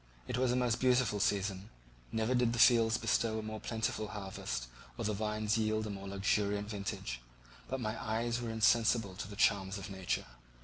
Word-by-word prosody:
It - - -2
was 125 0 +2
a - - +1
most 125 -2 +1
beautiful 125 -4 +3
season; 100 0 0 0.4
never 110 +2 0
did 125 -2 +2
the - - -2
fields 115 -1 +6
bestow 110 -2 +1
a 110 - -3
more 110 0 -5
plentiful 110 -1 -2
harvest 95 - -4 0.3
or - - -3
the 105 - +1
vines 110 +1 0
yield 110 0 0
a 105 - -4
more 100 0 -7
luxuriant 100 +1 0
vintage, 95 - -4 0.5
but 130 - -3
my 110 -3 -3
eyes 115 +2 -1
were 120 - -3
insensible 110 -1 +3
to 95 - -6
the 100 - -9
charms 100 -1 +2
of 100 +1 -7
nature. 95 -2 -2
110 Hz, 185 wpm, -33 LUFS, 100-115 Hz, 0.5 s, fields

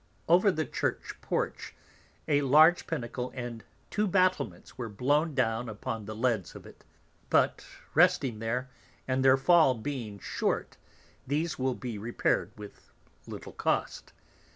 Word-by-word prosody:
Over 185 +5 +5
the 155 -3 -2
Church - - -3
porch, - - -3 0.5
a 145 -1 +3
large 155 +5 +5
Pinnacle 125 -4 -4
and 120 -2 -6 0.3
two 210 +1 +1
Battlements 185 - 0
were 120 -2 -5
blown 145 +8 +1
down 115 -2 0
upon 110 0 -5
the 110 +1 -6
leads 115 -5 -1
of - - -11
it, - - -15 0.5
but - - +2 0.3
resting 120 -5 +3
there, 125 +4 -3 0.4
and 130 0 0
their 130 0 +6
fall 155 -2 +5
being 115 -3 -5
short, - - -2 0.5
these 155 +4 -1
will 130 -1 0
be 120 -5 -6
repair'd 115 +3 0
with 105 -1 -12 0.4
little - - -8
Cost. - - -2
130 Hz, 135 wpm, -29 LUFS, 115-150 Hz, 0.5 s, their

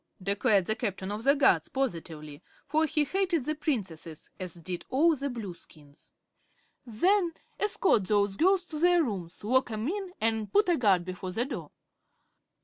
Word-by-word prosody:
declared 200 0 +2
the 220 - 0
Captain 200 -4 -3
of 210 +2 -4
the 280 +3 +5
Guards, 280 - +3
positively, 160 - -4 0.2
for 310 +3 +1
he 300 0 +2
hated 355 -3 0
the 310 - 0
Princesses, 185 - -4
as 180 -2 -5
did 175 +1 -6
all 315 +5 +4
the 280 0 -3
Blueskins. 170 - -10 0.7
"Then 340 - +1 0.2
escort 385 - +2
those 205 -2 +2
girls 370 - +3
to 310 -3 -6
their 350 0 +4
rooms, 190 - -5
lock 260 +4 +2
'em 220 +1 -3
in, 385 +2 -3
an' 220 -1 0
put 415 - +3
a 345 - +3
guard 195 -7 +3
before 185 0 -6
the 235 +5 0
door." 275 - -6
230 Hz, 160 wpm, -29 LUFS, 190-310 Hz, 0.7 s, the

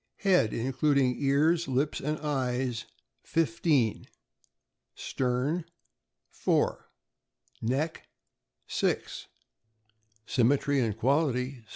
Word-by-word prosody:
Head, 180 - +3
including 130 +1 +1
ears, 150 +4 +2
lips, 135 +3 0
and 150 +2 -2
eyes. 125 -5 -1 0.4
15 160 -8 +1 0.9
Stern 135 +7 -1 0.7
4 - - 0 0.7
Neck 140 +8 -2 0.6
6 - - -2 1.0
Symmetry 140 +4 +2
and 110 -4 0
quality 130 0 0
135 Hz, 70 wpm, -29 LUFS, 125-150 Hz, 1.0 s, Head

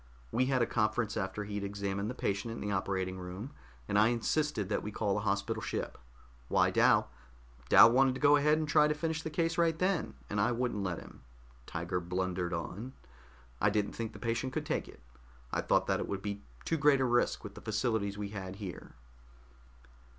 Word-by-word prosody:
We 130 +2 +2
had 130 -3 +2
a - - +3
conference 110 -1 0
after 95 +2 -2
he'd 105 0 -4
examined 100 0 -2
the 125 - -5
patient 100 0 -2
in 115 - -6
the 105 - -3
operating 95 -1 -1
room, 90 +8 -7 0.4
and 100 - +2
I 110 - +6
insisted 120 -1 0
that 105 - -1
we 105 - -5
call 105 -1 0
the 105 - 0
hospital 105 +2 -1
ship. - - -3 0.5
Why, - - +3
Dal - - +4 0.6
Dal 115 - +9
wanted 130 +1 +4
to - - -5
go 145 0 +6
ahead 150 +1 +4
and 155 -1 -1
try 150 0 +5
to 150 - 0
finish 160 +1 -2
the 160 - -4
case 165 +2 0
right 165 -1 +3
then, 185 -1 0
and 100 0 -1
I 120 +4 +2
wouldn't 120 -3 -1
let 90 -3 -2
him," - - -12 0.5
Tiger 90 - -2
blundered 90 0 -2
on. 100 +8 -5 0.7
"I 100 - +5
didn't 105 0 0
think 115 -1 -4
the - - -9
patient 115 +2 -2
could - - -2
take - - -1
it. - - -14 0.5
I - - 0
thought - - +2
that - - +1
it - - -3
would 95 -1 -4
be 100 -1 -4 0.2
too 165 - +1
great 145 -1 +5
a 130 - +2
risk 120 -1 +1
with 105 -2 -8
the - - -11
facilities 110 -2 -1
we 105 -1 -4
had 95 -2 -6
here." 95 -3 -8
110 Hz, 205 wpm, -32 LUFS, 100-130 Hz, 0.7 s, Dal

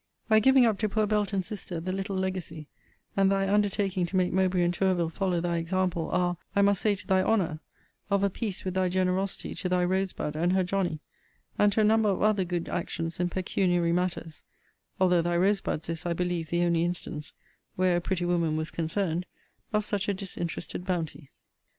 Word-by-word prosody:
Thy 220 0 +6
giving 265 +2 +6
up 220 -3 +1
to 215 - 0
poor 215 +1 +1
Belton's 205 -2 0
sister 195 -5 -5
the 180 +3 -3
little 195 +1 -3
legacy, 185 -5 -3 0.5
and 195 0 +4
thy 195 0 +1
undertaking 200 -3 +1
to 190 - -6
make 180 -1 +2
Mowbray 185 -1 +2
and 175 0 +1
Tourville 175 -2 +1
follow 185 -1 0
thy 170 0 -1
example, 175 0 -1
are, 175 -1 +1 0.2
I 200 - +4
must 200 -1 +3
say 210 -2 +2
to 200 - -10
thy 190 -2 +3
honour, 185 -7 +1 0.5
of 200 -1 +2
a 200 - +3
piece 205 -2 -3
with 185 - -2
thy 185 -1 +1
generosity 185 +1 -1
to 180 - -3
thy 180 0 +2
Rose 190 +1 0
bud 150 - -4
and 175 +3 +1
her 190 0 +3
Johnny; 180 -4 -1 0.6
and 205 0 +5
to 220 - +2
a - - +4
number 215 0 +4
of 195 - 0
other 210 -2 +3
good 175 -1 -3
actions 165 -1 -3
in 175 0 +1
pecuniary 175 -1 +1
matters: 170 -2 -2 0.6
although 180 -2 +4
thy 175 +1 0
Rose 195 +2 +3
bud's 155 - -3
is, 165 0 -4
I 175 -2 -1
believe, 175 -2 -2
the 175 0 +1
only 170 -1 +2
instance, 165 -3 -4 0.4
where 185 -1 +2
a - - -1
pretty 175 0 -1
woman 170 -3 +1
was 155 0 -3
concerned, 170 +1 -2 0.4
of 210 -1 +1
such 205 -1 -1
a 200 - +1
disinterested 180 -2 -5
bounty. 170 -5 -3
185 Hz, 200 wpm, -28 LUFS, 175-195 Hz, 0.6 s, Thy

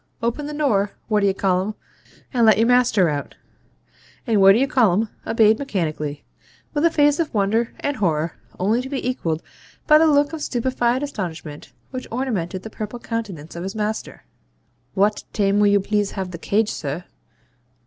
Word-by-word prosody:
Open 235 +6 -1
the 300 - -5
door, 210 -10 +1 0.2
What 210 -1 +3
d'ye 200 -1 +3
call'um, 190 +1 0 0.6
and 240 -2 +2
let 220 -1 +6
your 225 - +4
master 245 -6 +4
out,' 145 -2 -3 0.9
and 220 -5 +2
What 195 0 +8
d'ye 245 +6 +3
call'um 225 -6 +2 0.2
obeyed 220 -1 +4
mechanically, 155 - -3 0.5
with 295 -1 0
a - - +6
face 295 -1 +3
of 325 -3 0
wonder 220 +3 +1
and 285 -1 -1
horror, 165 -4 0 0.3
only 215 +6 +2
to 265 - -7
be 270 -3 -3
equalled 165 -11 -2 0.4
by 305 -1 +7
the 320 - +5
look 290 0 +3
of 320 - -5
stupefied 250 0 0
astonishment 170 - -6 0.2
which 255 0 -6
ornamented 205 -8 -3
the 220 - -8
purple 215 +3 -6
countenance 205 -11 -5
of 170 - -5
his 190 +4 -5
master. 215 0 -4 0.7
'Wawt 205 +2 +2
taim 200 -1 +2
will 210 - +5
you 200 0 +4
please 205 0 -1
have 190 -2 -4
the 170 - -7
CAGE, 210 +4 +1
sir?' 150 +3 -4
215 Hz, 170 wpm, -22 LUFS, 190-250 Hz, 0.9 s, What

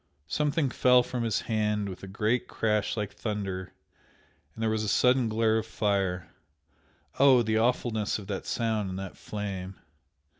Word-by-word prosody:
Something 150 - 0
fell 125 0 +5
from 125 0 -4
his 115 -2 0
hand 105 -2 0
with 95 -2 -7
a 95 - -8
great 110 +5 0
crash 105 0 0
like 105 -2 -3
thunder 100 -4 -4 0.8
and 115 - -4
there 110 - +2
was 110 0 0
a - - -2
sudden 125 +3 +3
glare 110 0 +2
of - - -6
fire! 95 -4 -1 0.9
oh, 130 -3 +6
the 110 0 +1
awfulness 115 -2 +1
of 105 - -9
that 95 -1 -5
sound 110 -4 -1
and 95 - -5
that 95 -1 -6
flame! 95 -3 -5
110 Hz, 160 wpm, -28 LUFS, 100-115 Hz, 0.9 s, oh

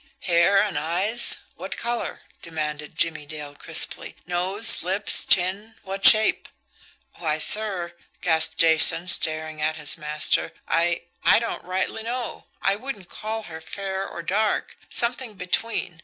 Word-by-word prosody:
"Hair 175 +2 +3
and 195 -6 0
eyes 185 +10 +1 0.2
what - - -7
color?" 235 0 -4 0.2
demanded 150 -2 -5
Jimmie 155 -3 -1
Dale 150 -1 -8
crisply. - - +1
"Nose, 185 +5 +4
lips, 190 +4 +2
chin 195 +5 +1
what 195 +1 -6
shape?" 215 -1 +5 0.7
"Why, 155 -3 -1
sir," 185 -1 +1 0.3
gasped 160 -2 +1
Jason, 165 +1 +4
staring 155 -2 0
at 155 +1 0
his 150 +1 0
master, 150 0 -1
"I 170 +1 0 0.2
I - - +5
don't 230 0 -4
rightly 185 +4 -3
know. 240 +2 -5 0.2
I 195 +1 +2
wouldn't 215 -6 -8
call 220 +1 -5
her 160 -4 -10
fair 195 +2 -5
or 170 - -8
dark, 210 +5 -1
something 235 -1 +2
between. 180 -1 -3
180 Hz, 135 wpm, -23 LUFS, 160-210 Hz, 0.7 s, shape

